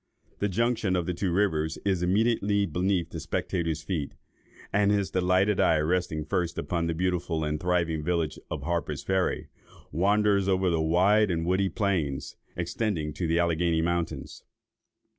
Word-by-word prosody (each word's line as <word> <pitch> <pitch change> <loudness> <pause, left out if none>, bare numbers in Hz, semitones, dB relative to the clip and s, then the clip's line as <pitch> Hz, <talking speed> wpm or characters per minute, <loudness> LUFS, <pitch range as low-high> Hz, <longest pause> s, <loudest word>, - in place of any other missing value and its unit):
The 100 - 0
junction 115 -1 +1
of 90 -2 0
the 90 - -1
two 90 +1 -1
rivers 80 -5 +1
is 95 -3 +1
immediately 100 +1 +2
beneath 90 +1 -1
the - - -5
spectator's 80 -3 -2
feet; 80 -5 -3 0.6
and 100 0 +3
his 100 -2 +1
delighted 95 +2 +2
eye 80 - +4
resting 80 -1 0
first 90 0 -1
upon 85 -1 -1
the 85 - -1
beautiful 90 -2 -1
and 75 0 -1
thriving 85 -2 0
village 85 -2 -1
of 75 -4 -4
Harper's 75 -3 -2
Ferry, 95 -1 0 0.4
wanders 100 +3 +2
over 95 -1 +2
the 80 -1 +1
wide 95 +6 +3
and 85 -2 -1
woody 95 +2 +1
plains, 90 -11 -1 0.2
extending 85 -3 -2
to 85 +3 -2
the 80 +1 +1
Alleghany 85 -1 +1
mountains. 85 -1 -3
90 Hz, 155 wpm, -27 LUFS, 80-95 Hz, 0.6 s, eye